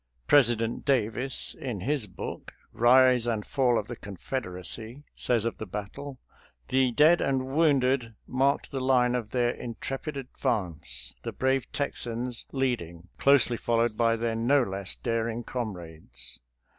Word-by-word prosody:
President 120 -5 +3
Davis, 130 -1 0
in 120 -8 -5
his 135 -1 0
book, 95 - -7
" - - -30
Kise 125 0 +5
and 105 -2 -3
Fall 125 -4 +2
of 105 - -1
the 120 - -6
Confederacy," 110 - -5
says 115 -3 +1
of 115 - -3
the 110 - -5
battle: 130 +9 -6 0.3
" - - -33
The 130 -1 +3
dead 155 +7 +5
and 135 0 -1
wounded 135 -7 +2
marked 135 +2 +1
the 135 - -2
line 125 -2 +3
of 120 -4 -2
their 120 0 +1
in 120 -2 -7
trepid 140 +2 -5
advance, 80 - -3
the - - -4
brave 130 -1 0
Texans 120 -3 -3
leading, 90 -11 -2
closely 135 -4 +4
followed 115 -1 +1
by 115 0 +3
their 115 0 -1
no 130 +5 +3
less 95 -3 -2
daring 115 0 -2
comrades." 85 - -6
120 Hz, 145 wpm, -28 LUFS, 110-130 Hz, 0.3 s, Kise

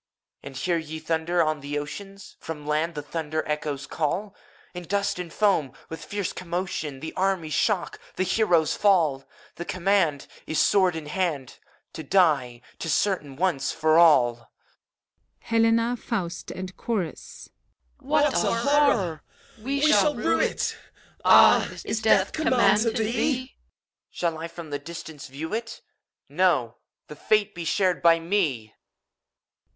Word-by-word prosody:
And 135 -1 -9
hear 170 +3 0
ye 160 0 -7
thunders 165 +2 0
on 155 -2 -1
the 145 +1 -4
ocean 195 +7 -6
f 195 - -14
From 150 -2 -7
land 155 +3 -1
the 150 - -5
thunder 155 +1 -4
echoes 150 -2 -3
calif 180 +8 -2 0.4
In 180 - -6
dust 200 0 -1
and 175 -2 -6
foam, 165 -10 +1 0.2
with 160 - -7
fierce 205 -3 -4
commotion, 170 -6 -4
The 160 - -6
armies 185 -5 -1
shock, 185 +4 0 0.2
the - - 0
heroes 180 -5 +2
fall! 165 -10 +2 0.3
The 175 - -4
command 180 -7 +1 0.2
Is, 160 - -2
sword 185 -4 +3
in 160 -2 -6
hand. 150 -5 -3 0.3
To - - -6
die: 145 -8 +2 0.2
't - - -5
is - - +1
certain, 165 -9 -1
once 165 -4 0
for 160 0 +3
all. 120 -8 +4 0.9
HELENA^ 230 +1 +2
FAUST, 180 -7 -4
AND 185 0 -7
CHORUS. 210 -8 -5 0.5
What 290 0 +1
a - - +2
horror! 230 - +2 0.4
We 275 +5 -2
shall 300 0 +4
rue - - +1
it! - - -1 0.5
Ah, - - +6
is 220 - -2
Death 200 -3 +3
command 255 -8 +3
to 230 - +2
theet 220 - 0
EUPHORION. 255 +3 -1 0.6
Shall 170 -2 -2
I 165 - -4
from 165 -2 -10
the 145 - -2
distance 160 -1 -9
view 150 +7 -7
itt 230 +1 -5 0.5
No! 145 -7 +1 0.3
the 150 - -10
fate 210 +5 +1
be 170 -1 -6
shared 185 +2 +1
by 165 -1 +5
me! 165 - -1
170 Hz, 145 wpm, -25 LUFS, 150-205 Hz, 0.9 s, Ah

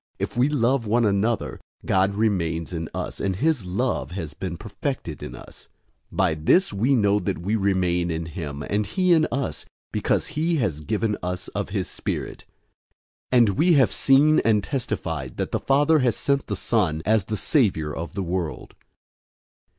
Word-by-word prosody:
If 100 +2 -4
we 125 +4 +3
love 130 -4 +1
one 115 +2 +3
another, 105 +3 0 0.3
God 95 +1 +2
remains 90 -6 0
in 80 -2 -4
us, - - -5
and 95 -2 0
his 135 - 0
love 95 - -1
has 80 -6 -5
been 90 0 -5
perfected 105 - -5
in - - -7
us. - - -14 0.4
004:013 - - -11
By - - +3
this 85 - +2
we 120 +8 +2
know 105 -3 +3
that 90 - -2
we 95 +7 -1
remain 90 -4 +1
in 80 0 -2
him 75 -3 -6
and 105 +5 -1
he 185 - +2
in 160 -2 +4
us, 135 +2 -2 0.3
because - - 0
he 160 +2 0
has 100 - -1
given 105 +4 -1
us 90 0 -4
of - - -4
his - - -2
Spirit. - - -5 0.9
004:014 120 -4 +5
We 175 - +4
have 135 -4 +4
seen 145 +3 +4
and 105 -3 +2
testify 80 - -3
that - - -3
the - - 0
Father 145 +3 +3
has 125 -4 +2
sent 140 -1 0
the - - -2
Son 85 -9 0
as 105 -1 +2
the 110 +1 -3
Savior 95 - +1
of 85 +3 -6
the 100 - -1
world. 90 -2 -4
105 Hz, 175 wpm, -24 LUFS, 85-130 Hz, 0.9 s, 004:014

